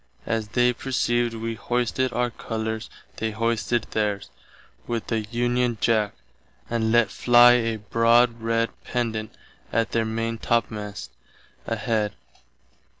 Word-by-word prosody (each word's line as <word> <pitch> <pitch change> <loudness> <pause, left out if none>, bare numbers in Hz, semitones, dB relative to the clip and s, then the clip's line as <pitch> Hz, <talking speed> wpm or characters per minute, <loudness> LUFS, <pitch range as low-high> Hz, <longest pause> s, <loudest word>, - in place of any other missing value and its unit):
As 110 -2 -1
they 125 +3 +2
perceived 120 -2 0
wee 115 0 -3
hoisted 125 +2 -1
our 120 0 0
colours 110 -1 -4 0.3
they 110 - -1
hoisted 115 +2 0
theirs, 105 -2 -1 0.6
with 115 -2 -2
the 115 - 0
Union 120 0 0
Jack, 110 -3 +2 0.5
and 115 -1 0
let 120 -4 +4
fly 120 +4 +6
a 115 -2 +2
broad 115 +2 +3
red 115 0 0
Pendant 110 -3 -2 0.4
at 115 0 0
their 115 -1 +1
maintopmast 115 -2 -2 0.6
head. 105 -3 -1
115 Hz, 115 wpm, -24 LUFS, 110-120 Hz, 0.6 s, fly